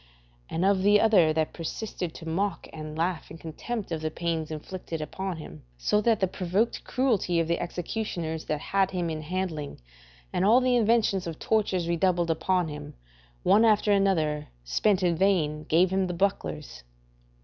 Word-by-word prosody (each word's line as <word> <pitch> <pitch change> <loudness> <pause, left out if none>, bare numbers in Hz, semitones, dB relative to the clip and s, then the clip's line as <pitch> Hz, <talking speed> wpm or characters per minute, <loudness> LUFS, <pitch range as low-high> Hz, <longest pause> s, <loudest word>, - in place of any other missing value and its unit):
And 170 +3 0
of 195 -1 +3
the 205 +1 +5
other 200 -8 +5
that 155 0 0
persisted 175 0 -5
to 165 - -9
mock 195 +5 -1
and 155 -1 -7
laugh 170 0 -1
in 160 - -9
contempt 190 +6 -5
of 160 -1 -2
the 155 - -1
pains 165 -1 -2
inflicted 165 +1 -6
upon 185 +3 -4
him; 115 - -10 0.2
so 210 - +1
that 225 -1 +2
the 190 - +2
provoked 190 +5 -1
cruelty 220 -9 +1
of 165 - +1
the 170 - 0
executioners 175 -3 -4
that 150 - -2
had 195 +4 +1
him 175 -3 -2
in 155 -1 -4
handling, 160 -3 -4 0.5
and - - +1
all 220 +5 +6
the 255 -1 +2
inventions 220 -5 +2
of 165 -2 -5
tortures 195 -6 0
redoubled 170 0 +1
upon 180 +2 +1
him, 150 -1 -8 0.5
one 215 +3 +5
after 210 -2 +4
another, 160 -7 +2 0.2
spent 185 - +1
in 175 -2 +3
vain, 160 -5 +1
gave 175 +3 +3
him 190 0 +1
the 180 - -3
bucklers? 155 - -2
175 Hz, 170 wpm, -27 LUFS, 160-195 Hz, 0.5 s, all